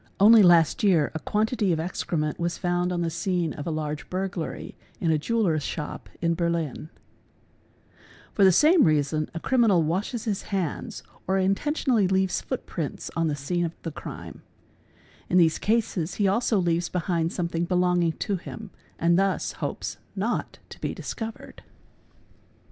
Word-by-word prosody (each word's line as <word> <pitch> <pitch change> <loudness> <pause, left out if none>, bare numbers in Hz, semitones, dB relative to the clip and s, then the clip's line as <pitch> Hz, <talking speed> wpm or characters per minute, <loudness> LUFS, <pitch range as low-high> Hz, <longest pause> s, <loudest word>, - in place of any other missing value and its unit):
Only 215 +3 +8
last 170 -4 +5
year 175 -8 +3
a 160 - -3
quantity 215 - 0
of 160 - 0
excrement 160 -2 -2
was 170 0 -1
found 175 0 0
on 175 -1 -1
the 165 - -1
scene 175 -2 -1
of 145 - -7
a - - 0
large 155 -1 -4
burglany 185 -3 -4 0.3
in 165 - +1
a 155 - +2
jeweller's 185 -4 +1
shop 150 +1 -5
in 170 0 +3
Berlin 165 -3 -2 1.0
$™, - - -31 0.3
For 200 - +3
the 190 - +8
same 310 - +5
reason 155 -1 +1
a - - -2
criminal 220 -7 +3
washes 195 +9 -2
his 205 -4 -1
hands 190 -6 -3 0.2
or 190 +1 +2
intentionally 215 +3 +1
leaves 190 0 +1
foot 260 - -4
prints 160 -5 -5
on 165 -1 +1
the 150 - 0
scene 175 +5 -2
of 170 0 -4
the 165 - -4
crime; - - -9 0.9
in 180 - +3
these 165 -3 +4
cases 210 -6 0
he 205 - +2
also 220 +2 +2
leaves 170 -2 +1
behind 170 -2 -1
something 170 -1 -2
belonging 180 -2 +2
to 200 +3 -2
him 210 +3 -9 0.3
and 170 +2 +3
thus 195 -1 0
hopes - - -4 0.2
not - - -2
to - - -12
be - - -3
discovered. 225 -1 -7
175 Hz, 160 wpm, -26 LUFS, 165-195 Hz, 1.0 s, Only